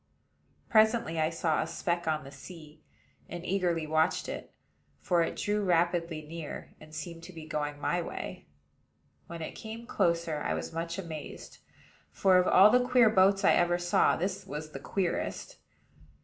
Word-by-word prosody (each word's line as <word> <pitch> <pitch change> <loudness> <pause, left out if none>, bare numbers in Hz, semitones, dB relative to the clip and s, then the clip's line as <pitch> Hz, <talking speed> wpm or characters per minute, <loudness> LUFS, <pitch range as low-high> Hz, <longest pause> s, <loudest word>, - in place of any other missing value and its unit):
Presently 220 -6 +3
I 155 0 +2
saw 165 -1 0
a 160 - -3
speck 170 +1 -2
on 155 -1 0
the 135 - -11
sea, 155 +2 -12 0.5
and 175 0 -7
eagerly 175 -4 0
watched 160 +2 +1
it; - - -6 0.5
for 175 -2 +1
it 165 - -1
drew 210 0 -1
rapidly 170 -3 +1
near, 160 0 -8
and 155 0 -13
seemed 165 +2 -7
to - - -10
be 160 -2 -9
going 150 -1 -3
my 175 +4 0
way. - - -7 0.8
When 170 -1 -6
it - - -5
came 225 +1 -8
closer, 170 -7 0
I - - -1
was - - -5
much 165 +1 -3
amazed; 160 -5 -8 0.5
for, 185 - +4
of 180 - +2
all 195 +3 +7
the 250 0 +4
queer 250 -3 +5
boats 195 0 +4
I - - +6
ever 175 0 +3
saw, 175 0 +3
this 185 +4 -3
was 150 +2 -6
the 135 - -7
queerest. 180 +6 -3
170 Hz, 165 wpm, -30 LUFS, 155-185 Hz, 0.8 s, all